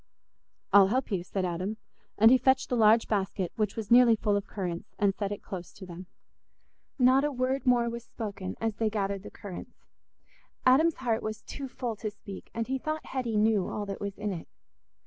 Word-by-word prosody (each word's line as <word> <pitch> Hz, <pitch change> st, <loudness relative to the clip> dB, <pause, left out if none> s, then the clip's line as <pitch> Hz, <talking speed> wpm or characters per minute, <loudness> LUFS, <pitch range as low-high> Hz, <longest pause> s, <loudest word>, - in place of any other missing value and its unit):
"I'll 200 Hz, -1 st, +8 dB
help 250 Hz, +4 st, -1 dB
you," 185 Hz, -3 st, -1 dB
said 185 Hz, +1 st, -2 dB
Adam; 185 Hz, +5 st, -3 dB, 0.4 s
and 225 Hz, +3 st, +7 dB
he 260 Hz, -, +7 dB
fetched 260 Hz, 0 st, +2 dB
the 250 Hz, -, +1 dB
large 225 Hz, 0 st, +5 dB
basket, 195 Hz, -3 st, -1 dB
which 210 Hz, -2 st, -1 dB
was 220 Hz, -1 st, -6 dB
nearly 240 Hz, -1 st, +7 dB
full 210 Hz, -1 st, 0 dB
of 200 Hz, 0 st, -2 dB
currants, 175 Hz, -4 st, -5 dB
and 200 Hz, -1 st, +2 dB
set 200 Hz, 0 st, -3 dB
it 205 Hz, -, -6 dB
close 180 Hz, -3 st, -7 dB
to 205 Hz, -, -10 dB
them. 180 Hz, 0 st, -9 dB, 0.9 s
Not 260 Hz, +1 st, +5 dB
a 295 Hz, -, +1 dB
word 260 Hz, +1 st, -1 dB
more 240 Hz, -1 st, +4 dB
was 235 Hz, 0 st, -5 dB
spoken 200 Hz, -4 st, -6 dB
as 225 Hz, -2 st, -2 dB
they 220 Hz, -1 st, +1 dB
gathered 200 Hz, -2 st, -2 dB
the -, -, -9 dB
currants. 195 Hz, -3 st, -9 dB, 0.9 s
Adam's 295 Hz, +6 st, +5 dB
heart 235 Hz, -4 st, -1 dB
was 215 Hz, 0 st, -5 dB
too 275 Hz, -1 st, -6 dB
full 245 Hz, -3 st, -4 dB
to 215 Hz, -, -3 dB
speak, 200 Hz, -2 st, -11 dB
and 230 Hz, 0 st, -2 dB
he 265 Hz, +2 st, -2 dB
thought 310 Hz, +3 st, -4 dB
Hetty 240 Hz, -5 st, -2 dB
knew 210 Hz, -3 st, +3 dB
all 210 Hz, -, -3 dB
that 195 Hz, -1 st, -6 dB
was 200 Hz, -1 st, -4 dB
in 210 Hz, 0 st, -2 dB
it. 165 Hz, -, -7 dB
215 Hz, 205 wpm, -29 LUFS, 200-245 Hz, 0.9 s, I'll